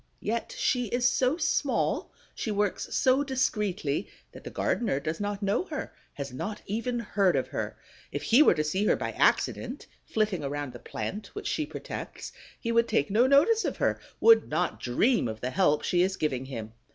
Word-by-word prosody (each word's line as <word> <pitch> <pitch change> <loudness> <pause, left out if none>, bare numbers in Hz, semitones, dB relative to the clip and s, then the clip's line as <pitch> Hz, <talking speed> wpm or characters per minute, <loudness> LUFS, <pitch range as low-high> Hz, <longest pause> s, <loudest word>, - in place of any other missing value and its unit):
Yet 230 +2 -2
she 250 -1 +1
is 245 +4 +2
so 255 +4 +2
small, 310 -4 0 0.2
she - - -4
works 205 -1 0
so 265 +2 +4
discreetly, 210 - -1 0.2
that - - -12
the - - -6
gardener 215 - 0
does 155 +2 -3
not 205 0 -3
know 200 - +1
her, 305 -6 -5 0.2
has 140 -2 -5
not 205 +11 -4
even 230 +4 -2
heard 200 -5 +1
of - - 0
her. - - -4 0.3
If - - -4
he 240 +6 +5
were 305 - +6
to 155 - +1
see 190 +7 0
her - - +4
by - - -3
accident, - - +1 0.2
flitting 210 -7 -1
around 145 -2 -3
the 120 - -9
plant 210 - -5
which 415 0 -6
she 310 -2 -1
protects, - - -7 0.3
he 230 - -2
would 230 0 +3
take 140 - +1
no 235 +5 +4
notice 320 +12 +5
of - - -2
her, - - +1 0.2
would 455 0 +6
not - - -1
dream 210 - +2
of 110 0 -5
the 125 +2 -3
help 150 -5 +2
she 175 - +2
is 190 +1 +1
giving 130 -4 -1
him. 115 -5 -7
210 Hz, 190 wpm, -28 LUFS, 155-250 Hz, 0.3 s, were